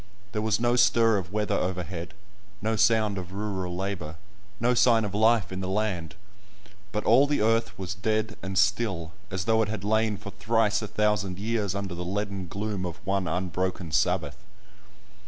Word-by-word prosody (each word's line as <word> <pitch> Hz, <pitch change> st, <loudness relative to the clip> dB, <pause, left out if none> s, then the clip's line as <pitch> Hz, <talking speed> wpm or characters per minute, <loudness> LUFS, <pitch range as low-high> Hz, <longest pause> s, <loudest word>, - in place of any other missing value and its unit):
There 105 Hz, -, -2 dB
was 110 Hz, -1 st, +1 dB
no 120 Hz, +1 st, +2 dB
stir 115 Hz, -3 st, +4 dB
of 90 Hz, -1 st, -8 dB
weather 105 Hz, 0 st, 0 dB
overhead, 90 Hz, 0 st, -3 dB, 0.4 s
no 110 Hz, +1 st, 0 dB
sound 110 Hz, -3 st, +3 dB
of 90 Hz, +1 st, -8 dB
rural 95 Hz, -3 st, -3 dB
labour, 90 Hz, -4 st, -4 dB, 0.4 s
no 120 Hz, +2 st, +3 dB
sign 115 Hz, -2 st, +4 dB
of 100 Hz, -, -5 dB
life 110 Hz, -2 st, +3 dB
in 95 Hz, -, -4 dB
the 95 Hz, -, -3 dB
land; 95 Hz, -5 st, -2 dB, 0.8 s
but 105 Hz, -, -2 dB
all 130 Hz, +6 st, +5 dB
the 145 Hz, -, +1 dB
earth 115 Hz, -2 st, +1 dB
was 95 Hz, 0 st, -4 dB
dead 110 Hz, +3 st, -1 dB
and 95 Hz, 0 st, -4 dB
still, 95 Hz, -7 st, +1 dB, 0.2 s
as 95 Hz, -3 st, -3 dB
though 110 Hz, 0 st, +3 dB
it 105 Hz, -, 0 dB
had 110 Hz, -3 st, -4 dB
lain 110 Hz, 0 st, +1 dB
for 100 Hz, -, -8 dB
thrice 110 Hz, -2 st, +1 dB
a 110 Hz, -, -4 dB
thousand 105 Hz, -3 st, 0 dB
years 105 Hz, -2 st, -1 dB
under 100 Hz, -2 st, -3 dB
the 85 Hz, +1 st, -4 dB
leaden 100 Hz, 0 st, -3 dB
gloom 100 Hz, +1 st, -3 dB
of 90 Hz, -1 st, -4 dB
one 95 Hz, -1 st, 0 dB
unbroken 90 Hz, 0 st, -2 dB
Sabbath. 80 Hz, -, +1 dB
100 Hz, 175 wpm, -27 LUFS, 95-110 Hz, 0.8 s, all